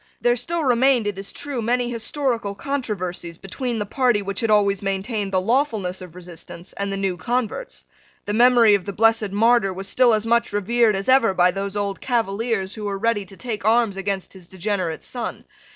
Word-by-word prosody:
There 240 0 +3
still 330 +7 -2
remained, 255 -2 +3
it 205 -2 -3
is 195 - -4
true, 285 -4 -4
many 245 +2 0
historical 230 -3 -2
controversies 190 - -4
between 235 +6 -4
the 210 - -2
party 240 -2 +1
which 200 0 -4
had 225 - 0
always 200 -2 +3
maintained 195 +1 -2
the 190 - +2
lawfulness 215 -4 0
of 180 -2 -11
resistance 175 0 -10
and 200 0 -3
the 195 - -2
new 195 -2 -1
converts. 245 - -3 0.4
The 205 - -2
memory 235 -1 +6
of 200 -3 +1
the 200 - -4
blessed 225 0 +3
Martyr 215 0 +3
was 190 +1 -5
still 245 +1 +4
as 215 0 -2
much 235 0 +1
revered 215 +2 +2
as 195 0 -4
ever 255 -7 +4
by 180 0 +4
those 195 +1 -4
old 200 -1 -2
Cavaliers 225 -4 -1
who 215 -2 -6
were 200 -1 -2
ready 210 -1 0
to 190 +1 -13
take 225 -5 -5
arms 225 -1 +3
against 195 -1 -3
his 185 -3 -12
degenerate 185 -3 -3
son. 245 -2 -5
210 Hz, 195 wpm, -22 LUFS, 195-240 Hz, 0.4 s, memory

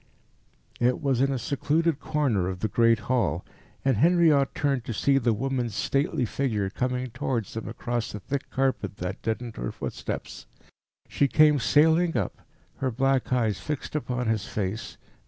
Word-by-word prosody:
It 125 +1 +2
was 135 -4 +1
in 135 0 +3
a 135 - 0
secluded 145 +5 0
corner 135 - 0
of 95 -1 -6
the 110 - +1
great 115 +1 +3
hall, 105 - 0 0.4
and 135 -5 +3
Henriot 160 - +4
turned 140 -5 0
to 115 - -4
see 135 +5 +3
the 120 -2 +2
woman's 120 -1 -1
stately 135 +2 0
figure 105 -6 -1
coming 125 +1 -2
towards 120 -3 -2
them 115 - -5
across 120 0 -3
the 105 - -6
thick 140 +6 -4
carpet 130 -7 -1
that 90 +2 -4
deadened 115 +1 -3
her - - -3
footsteps. - - -6 0.6
She 140 - +2
came 150 0 +5
sailing 160 +4 +4
up, 100 - -3 0.4
her 130 - 0
black 135 +2 +1
eyes 115 -6 +1
fixed 150 0 -5
upon 125 -4 -2
his 110 -3 0
face. 105 +2 -4
125 Hz, 160 wpm, -26 LUFS, 110-140 Hz, 0.6 s, came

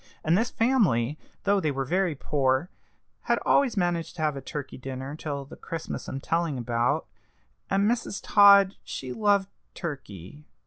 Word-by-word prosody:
And 160 +2 +3
this 225 +5 +1
family, 170 - +2 0.2
though 200 0 +3
they 155 - 0
were 135 -1 -2
very 180 +1 0
poor, 135 +3 0 0.6
had - - +4
always 265 -6 +3
managed 175 -3 -1
to 160 - -3
have 150 -2 +1
a 135 - -6
turkey 145 -2 -6
dinner 130 +2 -6
till 145 -3 -5
the 140 - -11
Christmas 165 -2 -6
I'm 135 - -4
telling 165 -1 -1
about, 120 +5 0 0.6
and 195 +1 +2
Mrs. 230 -3 -1
Todd 200 -2 +6
she 130 -1 -6
loved 205 -2 +2 0.3
turkey." 140 - -8
155 Hz, 160 wpm, -27 LUFS, 135-195 Hz, 0.6 s, Todd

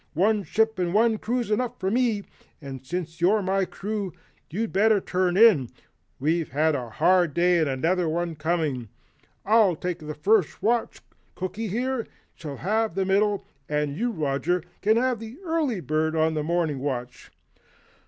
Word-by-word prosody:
One 210 +5 +3
ship 220 +1 0
and 180 +1 0
one 225 0 +3
crew's 240 -1 -2
enough 245 +3 -1
for 190 - -1
me, 230 -4 +1 0.4
and 135 -3 -8
since 170 +3 -5
you're 200 +4 +3
my 190 +1 +1
crew, 200 +1 -4 0.4
you'd 215 +7 -3
better 215 +1 +4
turn 185 -1 0
in 195 - +6 0.5
we've 160 +4 0
had 155 +4 +2
a 125 -5 -3
hard 175 +4 +2
day 175 0 +3
and 155 -3 +1
another 165 +6 0
one 170 +1 -1
coming. 155 -7 -1 0.6
I'll 210 -4 +4
take 175 +1 -4
first 195 +1 +1
watch, 235 +1 0 0.3
Cooky, 210 +4 -4
here, 245 +4 -2 0.3
shall 145 -4 -8
have 215 +1 0
middle, 195 +2 +1 0.2
and 150 -1 -1
you 235 +8 0
Roger 160 -1 -1 0.2
can 215 +2 +3 0.2
be 225 0 -8
the 340 - -18
early 315 - -1
bird 155 0 0
on 160 0 +2
morning 155 -1 -1
watch." 125 -3 -4
180 Hz, 155 wpm, -25 LUFS, 155-215 Hz, 0.6 s, in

